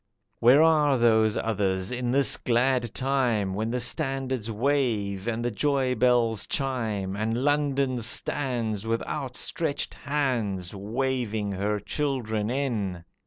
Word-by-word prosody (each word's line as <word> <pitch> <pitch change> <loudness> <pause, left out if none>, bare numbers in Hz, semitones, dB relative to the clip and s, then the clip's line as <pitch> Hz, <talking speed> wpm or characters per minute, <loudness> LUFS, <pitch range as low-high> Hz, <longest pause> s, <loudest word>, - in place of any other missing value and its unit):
Where 130 +6 +6
are 150 -4 +4
those 110 -2 +3
others 95 -3 -1
in 125 -1 -2
this 135 +2 +4
glad 120 -1 +1
time, 125 -8 0
When 110 +3 -2
the 125 +2 -1
standards 130 -3 -1
wave 110 -5 0
and 115 0 -2
the 120 - 0
joy 130 +3 +1
bells 120 -3 +2
chime, 110 -8 -2
And 110 +3 -1
London 140 -3 +1
stands 115 -2 -1
with 115 0 -1
outstretched 140 +3 -3
hands 120 -11 -2
Waving 110 0 -2
her 105 +2 -1
children 110 -4 -2
in? 110 -10 -2
120 Hz, 120 wpm, -26 LUFS, 105-135 Hz, -, Where